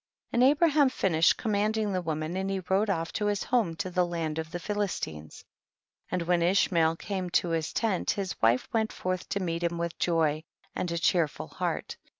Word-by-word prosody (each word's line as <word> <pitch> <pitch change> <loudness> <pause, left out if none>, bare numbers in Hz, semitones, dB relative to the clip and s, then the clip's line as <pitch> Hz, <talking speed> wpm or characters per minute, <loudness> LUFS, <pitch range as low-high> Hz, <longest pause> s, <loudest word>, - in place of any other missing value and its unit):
45. - - -30
And 255 - +7
Abraham 300 -2 +4
finished 165 -9 +3
com 220 - -2
manding 210 0 +1
the 185 - 0
woman, 160 0 -3
and 190 +1 -2
he 195 -1 -1
rode 200 +3 +2
off 165 -4 -1
to 210 - -1
his 205 -1 0
home 225 -10 +1
to 185 +1 -4
the 180 0 +2
land 165 -3 -2
of 160 0 -4
the 175 - -4
Phil 205 +4 -4
istines; 80 - -4 0.7
and 180 -1 -1
when 175 0 +2
Ishmael 170 -2 +3
came 185 0 -4
to 175 - +1
his 165 -1 -1
tent 215 -6 0
his 195 -2 -1
wife 115 +3 +3
went 220 -1 +1
forth 185 -1 -3
to 200 - -1
meet 170 -3 -2
him 170 0 -1
with 170 0 -4
joy 160 -3 +1 0.3
and 175 - -2
a 170 - -1
cheerful 165 -2 +1
heart. - - -3
180 Hz, 205 wpm, -28 LUFS, 165-200 Hz, 0.7 s, And